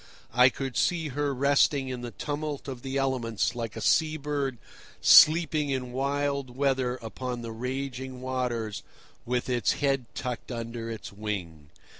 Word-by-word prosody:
I 125 +2 +7
could 135 -2 -5
see 165 -3 +1
her 145 +1 -1
resting 140 0 +3
in 125 -1 -4
the 120 - -5
tumult 145 +3 -4
of 130 -3 -6
the 135 +1 -3
elements 125 -6 0
like 115 -3 -5
a - - -5
sea 155 -1 +3
bird 140 -3 -2 0.4
sleeping 155 -2 +6
in 130 -2 -2
wild 140 -1 -1
weather 135 -3 +1
upon 120 +1 -5
the 115 - -5
raging 130 +2 -4
waters 125 -4 -2 0.5
with 125 0 0
its 125 -2 +2
head 135 -3 0
tucked 125 -2 -4
under 115 -1 -5
its 110 -3 -7
wing. 90 -8 -5
130 Hz, 150 wpm, -28 LUFS, 120-140 Hz, 0.5 s, I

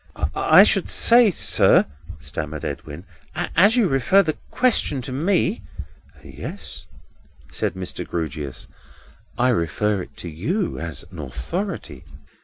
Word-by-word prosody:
"I - - +6
should - - +2
say, 235 -1 +5
sir," 180 - +4 0.3
stammered 75 +1 -5
Edwin, 75 +3 -7 0.5
"as 200 +7 +5
you 235 -5 +3
refer 145 +8 +3
the 155 -3 -2
question 235 - +2
to 130 - -5
me—" 170 +8 0 0.6
"Yes," - - -8 0.6
said - - -2
Mr. 95 -1 -5
Grewgious, 75 -5 -5 0.7
"I 125 +1 +3
refer 105 - 0
it - - -12
to - - -7
you, 160 - -2
as 85 -3 -5
an 85 - -10
authority." 75 - -5
105 Hz, 120 wpm, -22 LUFS, -, 0.7 s, I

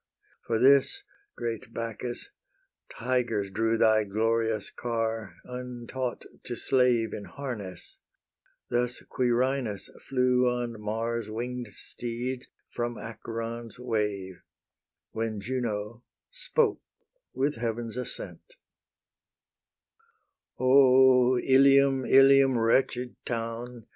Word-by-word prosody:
For 115 - +1
this, 135 +3 +4 0.3
great 115 -1 -5
Bacchus, 115 +1 -3 0.7
tigers 115 -5 0
drew 115 +2 +1
Thy 110 -1 +4
glorious 110 +1 0
car, 115 -3 -3
untaught 125 0 -5 0.2
to 120 - -4
slave 125 -4 +2
In 100 - -6
harness: 110 -10 -7 0.7
thus 120 0 0
Quirinus 125 -3 0
flew 125 -1 +2
On 120 -3 -3
Mars' 115 +1 -2
wing'd 120 +2 -4
steeds 125 +2 -5 0.3
from 120 -1 -3
Acheron's 115 +1 -6
wave, 105 -6 -2 0.7
When 110 -1 -3
Juno 115 -1 -3 0.3
spoke 450 -4 0 0.5
with 140 +1 0
Heaven's 115 0 -3
assent: 125 - -7 2.0
"O 130 -1 +6
Ilium, 135 0 +5
Ilium, 135 -1 +6
wretched 125 +2 +1
town! 115 0 -5
120 Hz, 90 wpm, -28 LUFS, 115-125 Hz, 2.0 s, O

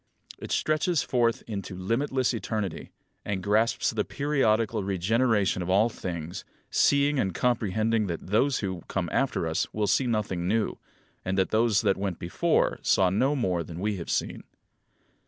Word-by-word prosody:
It - - -7
stretches 155 +1 +1
forth 120 -2 +1
into 100 -4 -5
limitless 125 +7 0
eternity, 105 -6 -3 0.3
and 95 -2 -3
grasps 110 +4 +2
the - - -1
periodical 115 -7 0
regeneration 100 +1 +1
of 90 - -4
all 100 +5 +4
things, 85 -4 -6 0.3
seeing 140 0 +3
and 95 -7 -1
comprehending 110 -2 +1
that 85 -2 -5
those 115 +8 +1
who 95 -4 -3
come - - -2
after - - 0
us - - -1
will 105 -1 +1
see 130 +5 +2
nothing 100 -6 -1
new, 110 +2 0 0.4
and 95 +1 -2
that 95 - +1
those 110 -1 +3
that 100 -3 +2
went 95 -3 -3
before 85 - 0
saw 95 -2 +3
no 130 +9 +2
more 95 -10 0
than 85 +1 -8
we 105 +1 -1
have 85 - -7
seen. - - -1
105 Hz, 155 wpm, -27 LUFS, 95-120 Hz, 0.4 s, all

